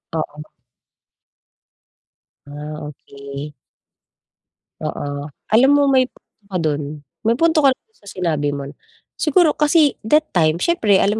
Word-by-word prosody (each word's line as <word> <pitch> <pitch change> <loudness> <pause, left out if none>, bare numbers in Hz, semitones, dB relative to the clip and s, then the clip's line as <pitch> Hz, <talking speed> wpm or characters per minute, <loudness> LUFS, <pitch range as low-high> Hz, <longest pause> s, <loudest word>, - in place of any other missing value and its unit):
Oo. 150 -1 -4 2.1
Ah, 150 +1 -7
okey. 140 0 -9 1.3
Oo. 145 0 -4 0.2
Alam 240 +5 +6
mo 290 - +4
may 260 -1 +4
punto 205 -4 -30
ka 195 - -8
dun, 150 -2 -2 0.2
may 230 - +4
punto 325 +2 +3
ka 280 -2 +6
run 445 - -49
sa 205 - -22
sinabi 155 -6 -1
mo. 140 0 -6 0.5
Siguro 315 +1 +4
kasi 300 -1 +3
that 310 +5 +3
time 160 -3 +3
siyempre 210 - +2
alam 210 +2 +1
180 Hz, 125 wpm, -20 LUFS, -, 2.1 s, Alam